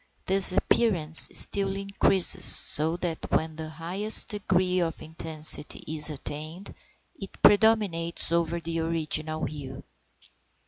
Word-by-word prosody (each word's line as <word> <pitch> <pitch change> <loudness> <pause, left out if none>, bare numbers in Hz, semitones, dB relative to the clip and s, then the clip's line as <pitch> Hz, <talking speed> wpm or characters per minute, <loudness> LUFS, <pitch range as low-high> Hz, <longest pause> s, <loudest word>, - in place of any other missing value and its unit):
This 195 0 +2
appearance 175 -6 +6
still 195 -1 +1
increases, 195 -1 -1
so 160 +3 +2
that 170 -3 -8
when 160 0 -4
the 160 0 -10
highest 180 +7 0
degree 185 -3 -3
of 165 -2 -6
intensity 155 -1 -3
is 155 0 0
attained 155 +5 -7 0.5
it 195 - -13
predominates 205 -7 -1
over 170 0 -4
the 165 0 -7
original 155 -1 -5
hue. 135 -3 -12
165 Hz, 110 wpm, -23 LUFS, 155-190 Hz, 0.5 s, appearance